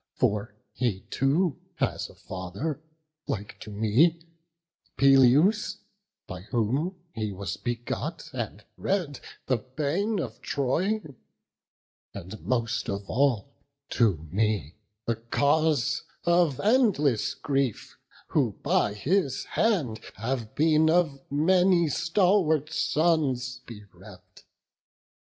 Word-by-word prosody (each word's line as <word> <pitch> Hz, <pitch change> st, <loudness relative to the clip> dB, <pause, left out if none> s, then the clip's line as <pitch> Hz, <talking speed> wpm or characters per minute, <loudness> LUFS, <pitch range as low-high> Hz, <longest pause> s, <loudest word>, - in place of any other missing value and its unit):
For 105 Hz, 0 st, 0 dB, 0.2 s
he 115 Hz, -7 st, -1 dB
too 145 Hz, +4 st, +1 dB, 0.2 s
has -, -, -2 dB
a -, -, -16 dB
father, 100 Hz, -, -5 dB, 0.5 s
like 105 Hz, -1 st, -4 dB
to -, -, -9 dB
me; 110 Hz, +11 st, +3 dB, 0.8 s
Peleus, 140 Hz, -, +5 dB, 0.5 s
by 90 Hz, -1 st, -7 dB
whom 125 Hz, -, -1 dB, 0.2 s
he 110 Hz, -2 st, -3 dB
was 95 Hz, 0 st, -4 dB
begot, 120 Hz, -, -4 dB
and 110 Hz, -4 st, -5 dB
bred, 175 Hz, -9 st, -1 dB, 0.3 s
The 130 Hz, -, +2 dB
bane 155 Hz, -, -2 dB
of 115 Hz, -3 st, -5 dB
Troy; 180 Hz, +11 st, 0 dB, 1.1 s
and, 100 Hz, +1 st, -8 dB
most 120 Hz, +3 st, -1 dB
of 100 Hz, 0 st, -4 dB
all, 135 Hz, 0 st, +1 dB, 0.4 s
to 90 Hz, -10 st, +1 dB
me 100 Hz, -6 st, 0 dB, 0.3 s
The 115 Hz, -1 st, 0 dB
cause 145 Hz, +4 st, +1 dB, 0.2 s
of 170 Hz, -5 st, +3 dB
endless 200 Hz, -, +2 dB
grief, 135 Hz, -5 st, -2 dB, 0.3 s
who -, -, +1 dB
by 105 Hz, 0 st, +2 dB
his 145 Hz, -, 0 dB
hand 165 Hz, -, 0 dB
Have 115 Hz, 0 st, -3 dB
been 155 Hz, +1 st, +4 dB
of 160 Hz, -5 st, +2 dB
many 175 Hz, +3 st, +3 dB
stalwart 165 Hz, -2 st, +2 dB
sons 135 Hz, -7 st, +1 dB
bereft. 105 Hz, -4 st, -14 dB
135 Hz, 100 wpm, -27 LUFS, 110-160 Hz, 1.1 s, Peleus